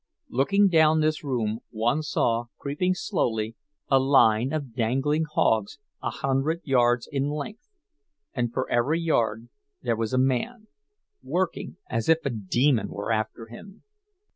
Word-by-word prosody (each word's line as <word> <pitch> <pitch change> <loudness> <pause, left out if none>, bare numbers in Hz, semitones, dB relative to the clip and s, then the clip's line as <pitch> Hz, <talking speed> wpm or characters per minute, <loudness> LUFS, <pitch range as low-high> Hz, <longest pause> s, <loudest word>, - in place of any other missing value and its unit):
Looking 200 +11 +3
down 160 -3 +4
this 155 0 0
room, 115 -6 -1
one 120 +6 0
saw, 120 -6 0
creeping 180 +6 -1
slowly, 115 - -1 0.3
a 135 - +4
line 130 -3 +4
of 145 -6 -4
dangling 135 +7 0
hogs 110 0 +1 0.2
a - - -2
hundred 135 +5 -1
yards 120 -3 +2
in 140 0 -1
length; 150 - -6 0.6
and 120 -3 -1
for 130 - -2
every 135 +7 +1
yard 115 -8 0 0.3
there 120 -2 +1
was 110 -1 -2
a 130 - 0
man, 135 - 0 0.6
working 180 -1 -2
as 115 +6 -2
if 160 -1 +3
a 140 - 0
demon 120 +4 +1
were 100 +3 -4
after 110 +1 -2
him. 190 - -13
135 Hz, 140 wpm, -26 LUFS, 115-155 Hz, 0.6 s, down